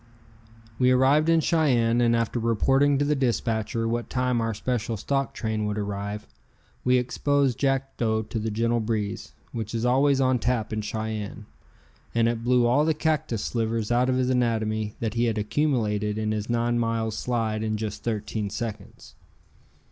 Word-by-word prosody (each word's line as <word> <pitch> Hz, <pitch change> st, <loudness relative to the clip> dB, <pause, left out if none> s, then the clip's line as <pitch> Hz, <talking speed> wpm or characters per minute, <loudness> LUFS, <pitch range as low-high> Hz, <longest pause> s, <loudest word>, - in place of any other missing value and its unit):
We 125 Hz, -1 st, +4 dB
arrived 135 Hz, +5 st, +4 dB
in 165 Hz, -1 st, +4 dB
Cheyenne, 120 Hz, -8 st, +2 dB
and 115 Hz, -1 st, +3 dB
after 115 Hz, +1 st, 0 dB
reporting 135 Hz, +5 st, +3 dB
to 145 Hz, -, +1 dB
the 150 Hz, -, +2 dB
dispatcher 115 Hz, -3 st, -1 dB
what 120 Hz, +1 st, -2 dB
time 125 Hz, -2 st, 0 dB
our 115 Hz, -1 st, -1 dB
special 115 Hz, -1 st, -2 dB
stock 135 Hz, +4 st, -1 dB
train 110 Hz, -1 st, -2 dB
would 105 Hz, 0 st, -2 dB
arrive, 100 Hz, 0 st, -4 dB, 0.6 s
we 125 Hz, 0 st, +4 dB
exposed 135 Hz, +1 st, +1 dB
Jackdo 130 Hz, -5 st, 0 dB
to 115 Hz, -, -3 dB
the 110 Hz, +1 st, -2 dB
gentle 115 Hz, +2 st, +1 dB
breeze, 110 Hz, -1 st, -3 dB, 0.2 s
which 115 Hz, -1 st, -4 dB
is 115 Hz, +1 st, -1 dB
always 135 Hz, +2 st, +3 dB
on 130 Hz, -1 st, +2 dB
tap 115 Hz, -3 st, -1 dB
in 110 Hz, -, -1 dB
Cheyenne, 110 Hz, -1 st, -4 dB, 0.7 s
and 115 Hz, 0 st, +3 dB
it 115 Hz, -1 st, -1 dB
blew 125 Hz, 0 st, +3 dB
all 125 Hz, +5 st, +3 dB
the 160 Hz, 0 st, +1 dB
cactus 150 Hz, -8 st, -1 dB
slivers 115 Hz, -1 st, -1 dB
out 125 Hz, +2 st, +3 dB
of 130 Hz, -, +2 dB
his 130 Hz, 0 st, +1 dB
anatomy 110 Hz, -3 st, 0 dB
that 110 Hz, -2 st, -2 dB
he 120 Hz, +1 st, +1 dB
had 115 Hz, -2 st, 0 dB
accumulated 105 Hz, -3 st, 0 dB
in 110 Hz, 0 st, -1 dB
his 110 Hz, +1 st, -3 dB
nine 120 Hz, 0 st, +1 dB
miles 115 Hz, -1 st, -1 dB
slide 110 Hz, -3 st, -1 dB
in 110 Hz, -1 st, -1 dB
just 105 Hz, -1 st, -5 dB
thirteen 110 Hz, -2 st, -2 dB
seconds. 105 Hz, +1 st, -7 dB
115 Hz, 170 wpm, -25 LUFS, 110-125 Hz, 0.7 s, We